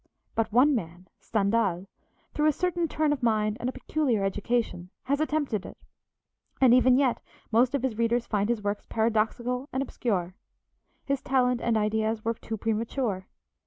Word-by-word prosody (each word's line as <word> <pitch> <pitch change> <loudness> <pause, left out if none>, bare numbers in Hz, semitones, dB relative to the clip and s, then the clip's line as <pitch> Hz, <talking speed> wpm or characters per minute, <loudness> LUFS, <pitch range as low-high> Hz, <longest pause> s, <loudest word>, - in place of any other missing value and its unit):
But 225 -1 0
one 260 +6 +5
man, 180 -5 -4
Stendhal, 200 -4 0 0.5
through 300 0 +2
a - - +6
certain 350 +1 0
turn 305 -1 +1
of 280 - -5
mind 215 -2 +1
and 245 - -1
a - - -2
peculiar 260 -8 -1
education, 195 -2 -1
has 280 +2 0
attempted 290 -10 -1
it, - - -10 0.8
and 255 -3 +6
even 255 0 +5
yet 265 -3 +2 0.3
most 245 +4 +3
of 270 - -2
his 235 -4 -2
readers 235 +1 +1
find 205 0 0
his 230 -3 -1
works 205 0 -3
paradoxical 235 +4 0
and 260 +1 -1
obscure. 190 -9 -2 0.7
His 275 -1 -1
talent 250 -2 +1
and 230 -2 +1
ideas 220 +1 0
were 230 - +1
too 225 0 -6
premature. 225 -2 -2
230 Hz, 160 wpm, -27 LUFS, 215-260 Hz, 0.8 s, a